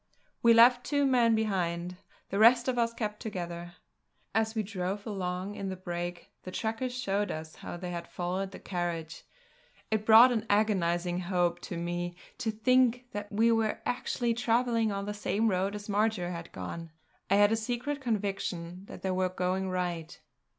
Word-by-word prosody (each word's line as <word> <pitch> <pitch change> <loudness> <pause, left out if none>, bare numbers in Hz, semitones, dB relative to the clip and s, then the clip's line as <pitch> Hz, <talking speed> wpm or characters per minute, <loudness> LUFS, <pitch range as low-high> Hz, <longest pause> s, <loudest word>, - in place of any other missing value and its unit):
We 230 -1 +6
left 245 +2 +7
two 285 +1 +1
men 240 -4 +4
behind; 180 -4 -1 0.3
the 200 - 0
rest 235 +2 +6
of 250 -2 +1
us 230 0 +2
kept 210 -2 -4
together. 175 -4 -5 0.6
As 220 +1 +1
we 220 - 0
drove 195 0 -4
along 190 -2 -3
in 200 -1 -4
the 190 - -3
brake, 175 -1 -5
the - - -8
trackers 225 +6 -2
showed 205 -4 0
us 155 0 -6
how - - -7
they 180 0 -5
had 170 -1 -5
followed 185 +2 -3
the - - -10
carriage. 170 -3 -4 0.7
It 215 -1 +1
brought 225 +3 +8
an 225 -2 -1
agonising 180 -4 +1
hope 175 -1 0
to 175 - -4
me 175 +1 -3 0.2
to 245 -3 -1
think 250 +2 +3
that 205 0 -6
we 225 +3 +3
were 225 -1 +1
actually 240 -1 0
travelling 230 -1 +1
on 200 0 -3
the 210 - -3
same 210 +1 0
road 195 +1 0
as 205 0 -7
Marjory 205 -3 +1
had 170 -1 -7
gone. 165 - -6 0.4
I 195 - +4
had 205 +1 +5
a - - +4
secret 245 +6 -3
conviction 195 -6 -3
that - - -11
we 190 - 0
were 185 0 +1
going 185 +1 -1
right. 175 -2 -3
200 Hz, 175 wpm, -30 LUFS, 180-225 Hz, 0.7 s, brought